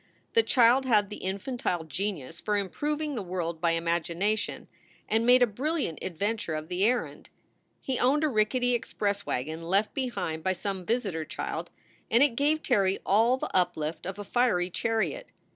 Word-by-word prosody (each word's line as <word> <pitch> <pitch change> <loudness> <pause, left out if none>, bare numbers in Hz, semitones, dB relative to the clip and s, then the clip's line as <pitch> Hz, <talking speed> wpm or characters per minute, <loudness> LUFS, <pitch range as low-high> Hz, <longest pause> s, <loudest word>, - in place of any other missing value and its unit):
The 460 - +6
child 255 - +4
had 210 -4 +3
the - - -5
infantile 190 -2 -2
genius 165 -2 -4
for 210 -1 0
improving 295 +10 -2
the 235 - -3
world 175 -3 -4
by 170 -1 +3
imagination, 170 +5 -1 0.4
and 225 +2 +1
made 250 0 +7
a - - +7
brilliant 260 - -2
adventure 195 -1 -2
of 155 +1 -5
the 180 +1 0
errand. 245 +2 -1 0.5
He 260 -2 -2
owned 280 +5 +3
a - - +4
rickety 245 +1 +1
express 205 -3 -2
wagon 155 +6 -3
left 195 +5 +1
behind 235 - -3
by 190 - +2
some 190 -1 -4
visitor 205 -9 -1
child; - - -5 0.4
and 235 +4 +5
it 280 -5 +2
gave 300 +4 +1
Terry 195 -6 +2
all 225 +6 +4
the - - -5
uplift 170 -3 0
of 190 +1 -5
a 205 - -5
fiery 195 -6 +1
chariot. 225 - -1
205 Hz, 165 wpm, -28 LUFS, 175-245 Hz, 0.5 s, made